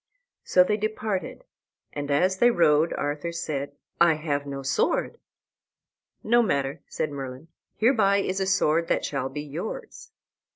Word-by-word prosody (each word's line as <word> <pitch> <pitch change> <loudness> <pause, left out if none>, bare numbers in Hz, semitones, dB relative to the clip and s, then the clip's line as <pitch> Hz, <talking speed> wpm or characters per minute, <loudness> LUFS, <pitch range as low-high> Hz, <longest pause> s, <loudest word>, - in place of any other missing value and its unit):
So 180 - +5
they 210 +3 0
departed, 215 -3 -3 0.5
and 145 -1 -4
as 185 +7 +2
they 240 - +6
rode 165 -6 +3
Arthur 145 +3 -3
said, 145 -4 -4 0.3
"I 170 -2 +5
have 145 -2 -2
no 140 -1 -5
sword." 465 - 0 1.0
"No 240 +2 +4
matter," 140 -8 -1
said 155 - -3
Merlin; 135 +2 -7 0.3
"hereby 215 -4 +3
is 190 -1 -1
a 190 - 0
sword 165 -3 +2
that - - 0
shall 135 -2 -2
be 145 +2 -5
yours." 155 +8 -7
165 Hz, 140 wpm, -26 LUFS, 145-195 Hz, 1.0 s, they